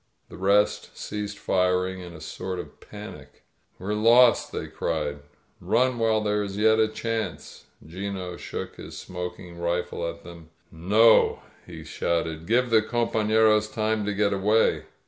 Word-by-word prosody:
The -, -, -11 dB
rest 100 Hz, +2 st, +1 dB
ceasecL 105 Hz, -1 st, -5 dB
firing 90 Hz, 0 st, 0 dB
in 90 Hz, -1 st, -9 dB
a 80 Hz, -, -11 dB
sort 90 Hz, +4 st, -5 dB
of 90 Hz, -, -9 dB
panic. 105 Hz, -9 st, -11 dB, 0.3 s
*We're 95 Hz, +3 st, -3 dB
lost!' 115 Hz, +3 st, +5 dB
they -, -, -4 dB
crie4*'?9f 75 Hz, -2 st, -3 dB, 0.4 s
*Run 130 Hz, -1 st, +1 dB
while 110 Hz, -1 st, +2 dB
there 105 Hz, 0 st, 0 dB
is 100 Hz, -1 st, -5 dB
yet 110 Hz, +1 st, +4 dB
a 110 Hz, -, +4 dB
chance!' 110 Hz, -8 st, -5 dB, 0.2 s
'Gino 90 Hz, +1 st, -5 dB
shook -, -, -7 dB
hi|^ -, -, -9 dB
smoking 90 Hz, -1 st, -7 dB
rifle 85 Hz, 0 st, -2 dB
at 85 Hz, -, -10 dB
them. 85 Hz, -2 st, -12 dB, 0.2 s
^>No,' 105 Hz, +8 st, +4 dB, 0.3 s
he -, -, -9 dB
shouted. 80 Hz, -1 st, -2 dB
^Give 120 Hz, +2 st, +2 dB
the 110 Hz, -1 st, +6 dB
compafleroa 110 Hz, -2 st, +2 dB
time 110 Hz, -1 st, 0 dB
to 105 Hz, -, -1 dB
get 100 Hz, 0 st, +1 dB
away!' 105 Hz, +3 st, +2 dB
100 Hz, 145 wpm, -25 LUFS, 90-110 Hz, 0.4 s, the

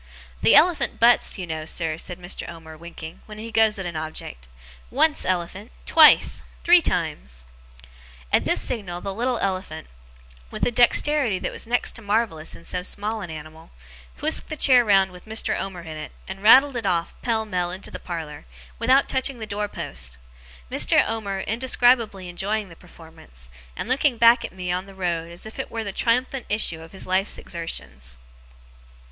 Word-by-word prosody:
'The -, -, +5 dB
elephant 345 Hz, 0 st, +4 dB
butts, 235 Hz, -1 st, +4 dB
you 185 Hz, -, -4 dB
know, 160 Hz, -2 st, -4 dB
sir,' 160 Hz, 0 st, -1 dB
said 175 Hz, +2 st, -5 dB
Mr. 180 Hz, 0 st, -6 dB
Omer, 160 Hz, -2 st, -10 dB
winking, 165 Hz, 0 st, -10 dB
'when 215 Hz, 0 st, -10 dB
he 225 Hz, +2 st, -7 dB
goes 220 Hz, -1 st, +3 dB
at 190 Hz, -, -5 dB
a 170 Hz, -2 st, -5 dB
object. 155 Hz, -, -6 dB, 0.4 s
Once, 300 Hz, +4 st, +2 dB
elephant. 175 Hz, -, -2 dB
Twice. -, -, +6 dB, 0.2 s
Three -, -, +7 dB
times!' -, -, -3 dB, 0.9 s
At -, -, +4 dB
this -, -, +1 dB
signal, 180 Hz, -7 st, -3 dB
the 195 Hz, -, -4 dB
little 245 Hz, +4 st, -1 dB
elephant, 185 Hz, -6 st, -3 dB, 0.6 s
with -, -, -2 dB
a -, -, +1 dB
dexterity 245 Hz, -1 st, +3 dB
that -, -, -4 dB
was -, -, -4 dB
next 245 Hz, +1 st, 0 dB
to 230 Hz, -, -8 dB
marvellous 205 Hz, -7 st, -1 dB
in -, -, -14 dB
so 180 Hz, +1 st, -3 dB
small 210 Hz, +4 st, -3 dB
an 180 Hz, -, -6 dB
animal, 155 Hz, +1 st, -10 dB, 0.5 s
whisked -, -, +1 dB
the 310 Hz, -, -5 dB
chair 255 Hz, -4 st, +5 dB
round 195 Hz, -3 st, +3 dB
with 180 Hz, 0 st, -14 dB
Mr. 220 Hz, +1 st, -1 dB
Omer 190 Hz, -3 st, -5 dB
in 160 Hz, -2 st, -8 dB
it, 150 Hz, -, -7 dB, 0.2 s
and 190 Hz, 0 st, -7 dB
rattled 265 Hz, +6 st, +7 dB
it 230 Hz, -4 st, -2 dB
off, 170 Hz, -2 st, 0 dB
pell 225 Hz, -2 st, 0 dB
mell, 180 Hz, -4 st, -1 dB
into 185 Hz, +2 st, -7 dB
the -, -, -7 dB
parlour, 160 Hz, -, -7 dB, 0.3 s
without 270 Hz, +1 st, +4 dB
touching 265 Hz, 0 st, -1 dB
the 220 Hz, -, -6 dB
door 210 Hz, 0 st, -3 dB
post: -, -, -4 dB, 0.5 s
Mr. -, -, +3 dB
Omer 200 Hz, -4 st, -3 dB
indescribably 235 Hz, -4 st, +2 dB
enjoying 200 Hz, +3 st, -3 dB
the 165 Hz, -, -13 dB
performance, 160 Hz, -, -14 dB, 0.3 s
and -, -, -5 dB
looking 260 Hz, 0 st, +2 dB
back 235 Hz, +1 st, +6 dB
at -, -, -5 dB
me 180 Hz, -1 st, -4 dB
on 180 Hz, +2 st, -2 dB
the 195 Hz, -, -13 dB
road 170 Hz, -3 st, -2 dB
as 170 Hz, -, -7 dB
if 220 Hz, -, -10 dB
it -, -, -4 dB
were 225 Hz, -1 st, -4 dB
the 200 Hz, -, -4 dB
triumphant 250 Hz, +3 st, 0 dB
issue 185 Hz, -6 st, 0 dB
of 165 Hz, -, -12 dB
his 190 Hz, -, -5 dB
life's 190 Hz, +2 st, 0 dB
exertions. 65 Hz, -, -5 dB
190 Hz, 180 wpm, -23 LUFS, 165-225 Hz, 0.9 s, Three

